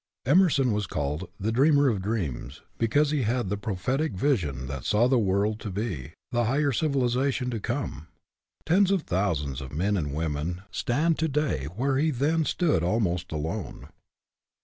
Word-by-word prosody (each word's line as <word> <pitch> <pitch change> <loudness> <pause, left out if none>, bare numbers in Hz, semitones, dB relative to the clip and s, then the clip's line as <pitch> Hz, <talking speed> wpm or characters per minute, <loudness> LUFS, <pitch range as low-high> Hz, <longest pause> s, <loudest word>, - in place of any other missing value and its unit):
Emerson 145 -4 +4
was 105 -2 -1
called 75 +4 -3
" 100 - -38
the 110 +4 -1
dreamer 140 +4 +4
of 105 -7 +1
dreams," 85 - -3 0.2
because 145 +6 +2
he 150 -2 +1
had 120 -2 0
the 105 - 0
prophetic 110 - -1
vision 90 - 0
that 70 -1 -5
saw 110 +4 +3
the 130 -1 +3
world 105 +1 +1
to 105 - -5
be, 95 - -4 0.2
the 120 -1 +1
higher 140 +5 +2
civilization 130 -2 0
to 115 - -3
come. 80 -5 -4 0.6
Tens 185 +4 +4
of 195 -5 +1
thousands 75 -8 -1
of 65 -2 -7
men 95 +8 0
and 75 -7 -1
women 80 +3 -2
stand 150 - 0
to 160 - +2
day 145 - -1
where 125 - -1
he 155 +3 +2
then 155 +4 +1
stood 155 - +1
almost 90 -2 0
alone. 80 +6 -4
110 Hz, 170 wpm, -27 LUFS, 85-140 Hz, 0.6 s, Emerson